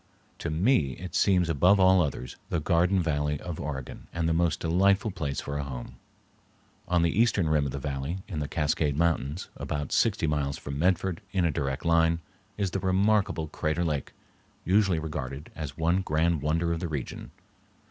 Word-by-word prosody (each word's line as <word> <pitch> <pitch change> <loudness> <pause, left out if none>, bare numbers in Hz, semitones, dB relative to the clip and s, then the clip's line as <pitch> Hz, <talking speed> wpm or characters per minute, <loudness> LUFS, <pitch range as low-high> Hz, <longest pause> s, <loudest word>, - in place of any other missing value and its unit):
To 80 - -3
me 80 - +2
it 90 0 -8
seems 90 -3 +3
above 90 +6 +4
all 95 -1 +6
others 70 -5 -3
the 85 - 0
garden 90 +3 +2
valley 75 -2 0
of 85 -3 -6
Oregon 70 -3 -6
and 85 -1 -1
the 80 - +2
most 85 -2 +1
delightful 95 +5 +2
place 70 -7 -3
for 70 0 -4
a - - -1
home. 60 -3 -7 0.9
On 85 -1 +2
the 85 - +3
eastern 105 -7 +2
rim 75 -2 +2
of - - -4
the 70 - -4
valley, 70 +6 -4
in 90 -8 -4
the 75 - -2
Cascade 75 -2 0
Mountains, 85 -1 0
about 75 -1 -4
sixty - - +2
miles 75 -2 -1
from 70 0 -6
Medford 90 0 +1
in 95 -3 +2
a 85 - +2
direct 70 0 -3
line, 85 0 +3 0.4
is 100 -3 -1
the 95 - -1
remarkable 95 -3 +2
Crater 80 +2 -1
Lake, 75 -4 -2 0.5
usually 95 -2 +3
regarded 75 -2 -5
as 75 -4 -5
the - - -10
one 85 +3 +3
grand 80 -2 +1
wonder 85 +3 +1
of 85 - -3
the 85 - -3
region. 75 -6 -5
80 Hz, 185 wpm, -28 LUFS, 75-90 Hz, 0.9 s, all